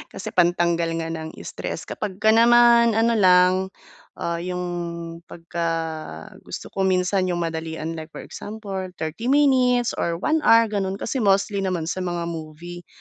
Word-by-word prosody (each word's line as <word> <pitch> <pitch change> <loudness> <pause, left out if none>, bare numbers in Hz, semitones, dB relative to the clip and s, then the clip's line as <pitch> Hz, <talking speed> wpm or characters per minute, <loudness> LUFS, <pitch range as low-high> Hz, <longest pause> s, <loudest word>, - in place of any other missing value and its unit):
kasi - - -6
pantanggal 170 -1 +2 0.2
nga 165 - -4
ng 160 -1 -6
stress. - - -5
Kapagka 210 +1 0
naman 235 0 +6
ano 230 +1 +3
lang, 185 -4 +5 0.6
ah, 170 0 -3
'yong 180 0 -4 0.6
pagka 170 0 -4 0.8
gusto - - -7
ko, 190 -1 0
minsan 185 0 +1
'yong 175 -1 -1
madalian 160 -1 -4
like 160 -1 -7
for - - -7
example 205 -2 -7 0.2
30 160 +10 -5
minutes 255 -4 +3
or 170 0 0
1 310 - 0
hour 230 0 +7
gano'n. 195 -2 -1
Kasi 260 +6 -3
mostly 200 -1 +2
naman 180 -4 -2
sa 185 - -4
mga 175 -2 -2
movie 170 +1 -8
185 Hz, 150 wpm, -23 LUFS, 170-220 Hz, 0.8 s, hour